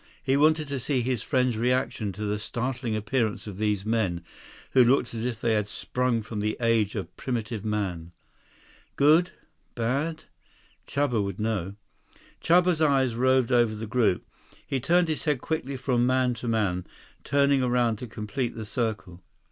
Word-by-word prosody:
He 135 -1 +2
wanted 155 +1 +3
to 140 -1 -2
see 130 +1 0
his 125 -2 -1
friend's 125 -3 +1
reaction 125 -3 0
to 105 +4 -6
the 105 0 -1
startling 120 +1 -3
appearance 110 +1 -1
of 100 -2 -8
these 105 -2 0
men 105 -7 0 0.5
who 130 - +6
looked 125 0 +2
as 115 0 -3
if 115 -3 -4
they 115 -1 +1
had 105 -2 +1
sprung 125 +1 -1
from 110 -1 -5
the 105 +1 -1
age 115 -3 +2
of 100 - -5
primitive 115 -4 -3
man. 95 -6 -3 0.8
Good? 155 +5 +5 0.5
Bad? 140 +8 -1 0.6
Chuba 130 -7 0
would 100 0 -5
know. 105 -3 -2 0.7
Chuba's 175 -1 +4
eyes 135 -5 +3
roved 130 +1 +2
over 120 -3 +3
the 110 +1 -5
group. 110 -4 +1 0.4
He 135 - -1
turned 175 +6 +3
his 155 -1 -3
head 150 -4 +1
quickly 140 -2 -3
from 125 -2 +1
man 130 -1 +2
to 120 +1 -6
man, 100 -6 0 0.4
turning 140 -1 +3
around 120 -3 +1
to 125 - -7
complete 115 +4 -4
the 110 - -6
circle. 105 -6 -3
120 Hz, 165 wpm, -26 LUFS, 105-130 Hz, 0.8 s, who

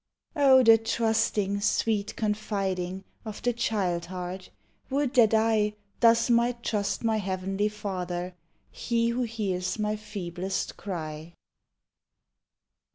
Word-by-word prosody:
Oh, 270 -3 +6
the 225 -1 +7
trusting, 220 -3 0
sweet 210 0 0
confiding 195 -4 -2 0.2
Of 215 -2 -8
the 245 - +2
child 190 -7 -1
heart! 180 0 -6 0.4
Would 275 -1 0
that 230 -4 +5
I 220 -1 +2 0.2
Thus 230 0 +5
might 235 0 +2
trust 205 -1 -1
my 225 -1 +2
Heavenly 195 +1 -1
Father, 185 -4 -4 0.4
He 230 -1 0
who 240 +2 -1
hears 205 -6 -2
my 210 0 -1
feeblest 190 -3 -4
cry. 160 -3 -6
210 Hz, 110 wpm, -27 LUFS, 185-230 Hz, 0.4 s, the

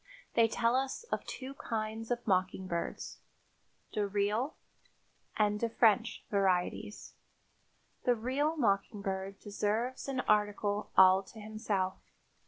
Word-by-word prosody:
They 230 -1 +5
tell 230 +2 +1
us 265 - -1
of - - -1
two 265 +1 -6
kinds 225 -3 -4
of 240 -1 -2
mockingbirds, 185 -2 -1 0.7
"de 210 -2 0
real" 210 +7 0 0.8
and 210 -1 +2
"de 230 - 0
French" 225 0 +2
varieties. 195 +1 0 0.9
The 245 - +4
real 275 +8 0
mockingbird 195 -4 -1
deserves 215 +7 -2
an 265 -2 -1
article 210 -1 +1
all 190 0 +8
to 220 - -13
himself. 210 -3 -2
215 Hz, 110 wpm, -32 LUFS, 200-235 Hz, 0.9 s, all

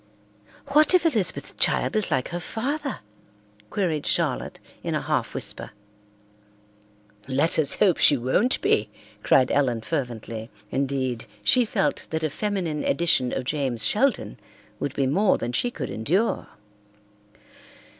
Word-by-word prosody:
"What 305 +5 +5
if 355 - +3
Elizabeth's 225 - 0
child - - +2
is 215 -3 +1
like 130 -5 0
her 175 - -4
father?" 275 - -3 0.7
queried 170 -7 -1
Charlotte - - 0 0.2
in - - -2
a - - -1
half - - -2
whisper. - - -4 1.6
"Let 140 +5 +2
us 150 - +2
hope 190 -5 +3
she 145 - +6
won't 130 - +1
be!" 105 0 +2 0.3
cried 130 +3 +3
Ellen 125 -5 +1
fervently. 115 -5 -4 0.2
Indeed, 130 -3 -2 0.2
she 245 - +5
felt 205 -3 -1
that 160 0 -2
a 155 - 0
feminine 180 -6 -2
edition 140 -5 +2
of - - -2
James 130 -4 -1
Sheldon 265 +5 0 0.4
would 140 - -3
be 135 - +1
more 190 +10 +3
than 120 - -3
she 185 - 0
could - - -6
endure. 180 - 0
150 Hz, 135 wpm, -25 LUFS, 130-210 Hz, 1.6 s, she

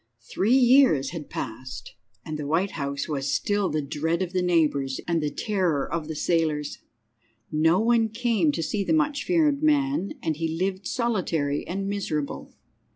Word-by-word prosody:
II. 115 0 -47
Three 220 +7 +3
years 255 - +5
had 165 -4 -7
passed, 120 -1 -6 0.3
and 155 - -4
the 145 - -4
White 175 +6 +1
House 140 -2 -3
was 140 -2 -2
still 205 -2 0
the 155 -1 -1
dread 160 +5 -1
of 180 0 -6
the 185 - +1
neighbours 150 -6 +1
and 170 -2 +1
the 150 - 0
terror 180 -4 0
of 165 -1 -3
the 160 - -5
sailors. 155 -2 0 0.7
No 160 +4 +3
one 230 0 +3
came 220 -8 +1
to 165 - -2
see 200 +4 -1
the 200 - 0
much 300 -2 +1
feared 310 -5 +2
man, 280 - +1
and 155 -2 -1
he 160 0 -2
lived 190 +1 -2
solitary 175 - -1
and 195 +2 -3
miserable. 175 -8 -3
170 Hz, 170 wpm, -25 LUFS, 150-215 Hz, 0.7 s, years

